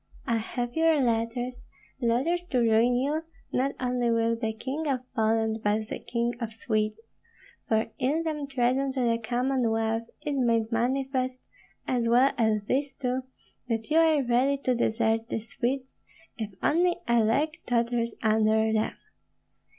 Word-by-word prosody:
I 230 -1 +1
have 240 +2 -4
your 320 -1 +4
letters, 245 0 -1 0.4
letters 265 +10 +1
to 275 - -1
ruin 230 +1 +4
you, 285 +5 0 0.3
not 270 +2 +1
only 245 -1 0
with 230 0 +1
the 220 -2 0
King 270 +8 -4
of 265 -3 0
Poland, 220 -1 +1
but 210 +1 +1
the - - -4
King 235 0 -1
of 230 -2 -3
Sweden, 215 -1 -1 0.7
for 220 0 +2
in 295 +6 +1
them 300 -3 -3
treason 265 +1 +1
to 260 - -1
the 230 -1 +2
Commonwealth 230 -2 0 0.2
is 290 -2 -1
made 230 -2 +2
manifest, 255 +2 0 0.5
as 240 -3 +1
well 250 +4 +5
as 215 -2 +2
this 270 +3 -1
too, 255 0 -2 0.4
that 225 +3 -2
you 315 - +4
are 315 -3 +4
ready 255 +3 +2
to 255 - +2
desert 225 -1 +1
the - - -1
Swedes 255 +4 -3 0.4
if 220 -3 -4
only 345 +3 +3
a 235 0 +4
leg 290 +9 +1
totters 235 -1 0
under 220 0 +3
them. 220 0 0
240 Hz, 150 wpm, -27 LUFS, 225-265 Hz, 0.7 s, well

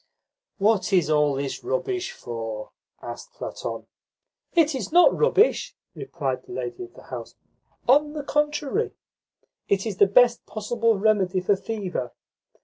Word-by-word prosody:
"What 210 0 +2
is 175 -5 +3
all 150 -2 +3
this 135 0 -4
rubbish 380 -3 -2
for?" 115 -2 -6 0.3
asked - - -8
Platon. - - -5 0.7
"It 320 -3 +4
is 250 -8 -4
not 350 +2 +6
rubbish," 455 -1 +3 0.2
replied 135 -3 -3
the - - -11
lady 130 - -5
of 360 - -19
the - - -14
house. - - -8 0.5
"On 295 +4 +4
the 300 -2 -4
contrary, 295 - 0 0.8
it 195 +1 +1
is 210 -4 -3
the 200 - +6
best 235 +4 +4
possible 225 +1 0
remedy 195 -3 +2
for 185 +2 +2
fever. 190 - -4
215 Hz, 140 wpm, -25 LUFS, -, 0.8 s, not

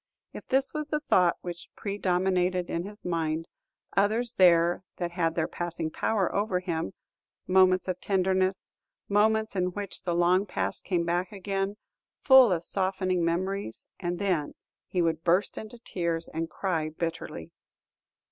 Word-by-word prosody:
If - - -9
this 265 +1 +1
was 305 -1 -3
the 300 0 -1
thought 180 - +3
which 175 -1 -7
predominated 185 -2 0
in 170 +1 -2
his 205 +1 -11
mind, 165 -2 -1 0.5
others 220 +4 +2
there 180 -6 +6
were 175 +2 -1
that 175 -1 -3
had 165 -2 0
their 160 -2 0
passing 170 -2 -4
power 200 0 0
over 200 -3 0
him, 165 - -3 0.5
moments 185 0 +4
of 185 -1 -3
tenderness, 190 -1 0 0.3
moments 220 +1 +2
in 180 -1 +1
which 205 0 -5
the 175 -2 -1
long 180 +3 +3
past - - -1
came 175 -3 0
back 175 +4 -1
again, 195 0 -3 0.4
full 265 -5 +7
of 170 -2 0
softening 185 -1 0
memories; 180 - -2
and 175 -1 -2
then 180 -7 -1 0.3
he 180 -2 0
would 165 -1 0
burst 180 +4 +2
into 220 +2 -8
tears 170 -7 -3
and 165 +1 -2
cry 165 -5 -1
bitterly. 165 - -5
185 Hz, 150 wpm, -28 LUFS, 170-200 Hz, 0.5 s, full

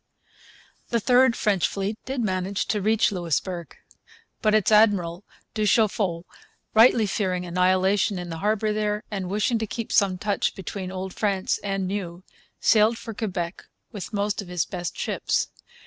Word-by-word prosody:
The 235 - +1
third 250 +1 +4
French 200 -5 +1
fleet 200 +2 -3
did 260 -1 -2
manage 190 -2 -1
to 210 -2 0
reach 215 +2 +2
Louisbourg. 175 -1 -3 0.6
But 215 -1 +3
its 215 -1 +2
admiral, 200 -5 +3 0.3
du 215 -1 0
Chaffault, 195 -6 +1 0.5
rightly 225 0 +6
fearing 185 -3 -1
annihilation 185 +3 +2
in 175 -1 -6
the 165 - -5
harbour 215 +2 +1
there, 210 0 -1
and 190 -3 -3
wishing 215 +4 +1
to 220 - -2
keep 230 +2 -5
some 195 -2 +3
touch 205 0 -1
between 190 0 -6
Old 190 0 -5
France 200 -3 0
and 195 -1 -1
New, 185 -2 -4 0.4
sailed 220 +1 +4
for 225 - -7
Quebec 185 -5 -4 0.3
with 205 -5 -7
most 205 0 -1
of 200 - -10
his 180 -2 -1
best 175 -2 -5
ships. - - -1
200 Hz, 155 wpm, -25 LUFS, 185-215 Hz, 0.6 s, rightly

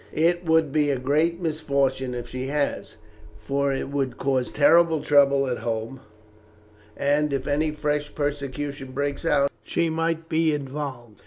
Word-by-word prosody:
It 175 +2 +2
will 160 0 +5
be 150 0 0
a 140 - +1
great 155 +7 +1
misfortune 140 -6 -1
if 120 0 -5
she 130 +1 -4
has, 145 0 -2 0.4
for 140 0 -1
it 135 - -3
would 135 -3 -2
cause 130 -2 0
terrible 165 +2 +4
trouble 140 -2 +4
at 125 -2 -2
home, 115 +3 -4 1.0
and 145 +1 +1
if 135 -1 -2
any 150 +2 +1
fresh 150 -1 -2
persecution 140 -2 -4
breaks 140 +3 -2
out, 140 -2 +3
she 165 +9 -1
might 165 0 -1
be 160 -1 +2
involved. 135 -6 -6
145 Hz, 150 wpm, -24 LUFS, 135-155 Hz, 1.0 s, will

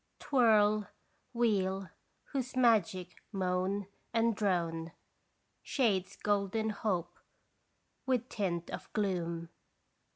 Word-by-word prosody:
Twirl, 215 -6 +4 0.4
wheel, 195 -5 +1 0.4
whose 260 -3 -2
magic 200 -7 +2
moan 190 0 0 0.3
and 230 -1 +3
drone 170 -5 0 0.7
Shades 205 -9 +1
golden 205 +2 0
hope 200 -4 -2 0.9
with 250 -2 +1
tint 175 -7 -2
of - - -7
gloom. 170 -5 -1
200 Hz, 85 wpm, -33 LUFS, 180-225 Hz, 0.9 s, Twirl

